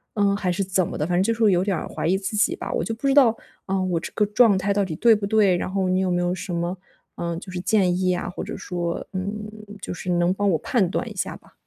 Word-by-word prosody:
嗯， 200 -1 +2
还 185 -3 -1
是 195 +2 -1
怎 185 -2 +1
么 - - -5
的 150 - -1
反 175 - 0
正 185 - +3
就 230 +2 +1
是 230 - -7
会 205 - +6
有 180 +1 +2
点 195 -4 0
儿 - - -5
怀 - - -5
疑 185 +3 +3
自 195 +2 -4
己 210 - +2
吧。 - - -5
我 - - 0
就 225 - -3
不 255 +5 -3
知 270 - +3
道， 275 -5 +7 0.4
嗯 195 0 0
啊， - - 0
我 175 -3 0
这 - - -7
个 210 - +2
状 210 -1 +4
态 200 +2 0
到 205 0 +1
底 175 -4 -4
对 230 -1 +5
不 205 - -3
对， 200 -3 +3
然 185 - -3
后 190 -1 0
你 185 0 +1
有 185 -1 0
没 175 - +1
有 175 +1 0
什 185 +1 -6
么， 170 +2 -2 0.4
呃， 170 -1 -3
就 185 - -9
是 180 -1 -4
建 185 -3 +2
议 185 -1 +1
啊， 175 - -3
或 180 - -6
者 - - -6
说， 170 -1 -4
嗯， 205 +3 -4 0.3
就 - - -5
是 180 - -6
能 175 +1 +2
帮 205 0 0
我 160 - +2
判 195 -3 +1
断 - - -2
一 - - -10
下 - - -3
吧。 - - -24
190 Hz, 330 characters per minute, -23 LUFS, 180-205 Hz, 0.4 s, 道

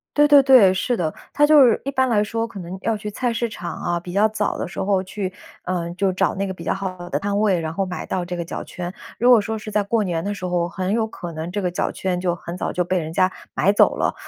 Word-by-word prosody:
对 295 0 +5
对 290 -1 +8
对， 255 -9 +6
是 235 +6 -1
的。 160 -4 -1 0.2
它 295 - +4
就 295 -2 +7
是 235 - +3
一 275 - -1
般 260 -1 +1
来 210 -3 +3
说 225 +2 -2
可 225 -3 -9
能 180 +1 -7
要 225 0 0
去 210 0 -6
菜 245 +3 -1
市 235 +1 -1
场 180 -5 -6
啊， 175 0 -2
比 175 +1 -9
较 200 +4 +4
早 210 -1 -1
的 - - -3
时 170 - -8
候 190 -1 +1
去， 190 0 -4 0.3
呃， 175 -2 -2
就 190 +1 +1
找 185 - +1
那 195 0 -2
个 190 - -4
比 - - -10
较 - - 0
好 185 -2 -5
的 - - -1
摊 200 0 -1
位， 200 -4 +2
然 160 -1 -4
后 195 +3 -1
买 180 -1 -5
到 180 -1 -2
这 180 0 -4
个 170 - -3
脚 170 - -6
圈。 175 -1 -6 0.3
如 245 - +4
果 245 -2 +8
说 220 +2 -3
是 215 0 -8
在 210 0 +1
过 215 +2 +1
年 170 -4 -2
的 205 +2 -2
时 185 -2 -6
候， 175 -1 0
很 185 +1 -3
有 225 0 +1
可 175 -5 -8
能 160 +2 -5
这 205 +2 -2
个 180 - 0
脚 175 - -1
圈 185 -2 -2
就 180 -1 0
很 170 +1 -7
早 - - -2
就 180 - +1
被 185 +2 0
人 160 -1 -5
家 185 +2 +3 0.2
买 195 - +3
走 205 - +4
了， - - 0
190 Hz, 310 characters per minute, -22 LUFS, 180-220 Hz, 0.3 s, 对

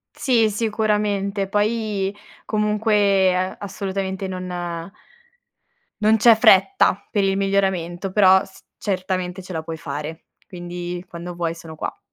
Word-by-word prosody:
Sì, 230 -5 +2
sicuramente. 210 -2 0
Poi 210 -1 0 0.3
comunque, 210 -2 +2
ehm, 185 +1 -1
assolutamente 195 -1 -4
non 185 -1 -5 1.5
non 215 +1 +5
c'è 230 +1 +7
fretta 220 - +4
per 205 -3 +1
il 195 0 +1
miglioramento, 190 -2 0
però 190 -2 +5
s 190 - -16
certamente 185 -2 -2
ce 185 - -10
la 160 -1 -3
puoi 165 0 -5
fare. 155 +1 -6 0.2
Quindi 175 0 -6
quando 170 +1 -8
vuoi 170 -1 -2
sono 165 -1 -10
qua. - - -5
195 Hz, 125 wpm, -22 LUFS, 180-210 Hz, 1.5 s, c'è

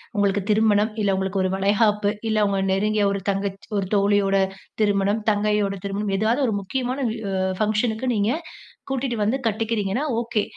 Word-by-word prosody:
உங்களுக்கு 200 0 +2
திருமணம், 215 0 +3
இல்ல 200 -2 +2
உங்களுக்கு 190 0 -1
ஒரு 185 - 0
வளைகாப்பு, 205 +1 +2 0.2
இல்ல 215 -1 +2
உங்க 195 -1 0
நெருங்கிய 210 +1 +1
ஒரு 200 -1 -2
தங்கச்சி 195 0 -3
ஒரு 190 -2 -1
தோழியோட 200 -1 +3 0.5
திருமணம், 205 +1 +2
தங்கையோட 210 -1 +1
திருமணம் 200 0 -2
ஏதாவது, 230 +7 +1
ஒரு 215 - 0
முக்கிய 200 +7 -3
மான 260 +2 -2
வி 225 - -5 0.4
ஃபங்க்ஷனுக்கு 220 +3 0
நீங்க 205 +3 +1 0.6
கூட்டிட்டு 265 -3 -2
வந்து 225 +6 +1
கட்டிக்கிறீங்கன்னா 225 +3 -1 0.2
ஓகே. 230 -3 -1
210 Hz, 155 wpm, -23 LUFS, 200-220 Hz, 0.6 s, திருமணம்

